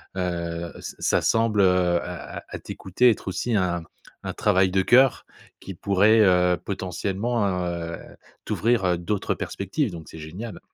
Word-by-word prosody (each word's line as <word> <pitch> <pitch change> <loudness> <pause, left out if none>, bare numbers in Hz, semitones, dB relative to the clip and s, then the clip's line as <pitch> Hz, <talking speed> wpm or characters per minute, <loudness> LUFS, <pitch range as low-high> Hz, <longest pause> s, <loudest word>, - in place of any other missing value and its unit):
heu, 85 -2 -3
ç - - -8
ça - - +2
semble, 115 -2 +2
heu, 90 -2 +3
à 90 -2 -7
à - - -7
à - - -6
t'écouter 120 +7 +1
être 105 - -1
aussi 110 +4 -1
un 90 -3 0 0.4
un - - -4
travail 95 0 +2
de 95 0 +2
cœur 130 +5 +4 0.3
qui 95 - -8
pourrait, 100 +4 +3
heu, 90 -2 +4
potentiellement, 100 +5 -2 0.2
heu, 85 -1 -4 0.5
t'ouvrir, 115 -3 +1
heu, 90 -1 +2
d'autres 95 +4 -2
perspectives 100 - -2
donc 80 -3 -9
c'est 80 - -10
génial. 90 +9 -7
95 Hz, 155 wpm, -24 LUFS, 85-105 Hz, 0.5 s, cœur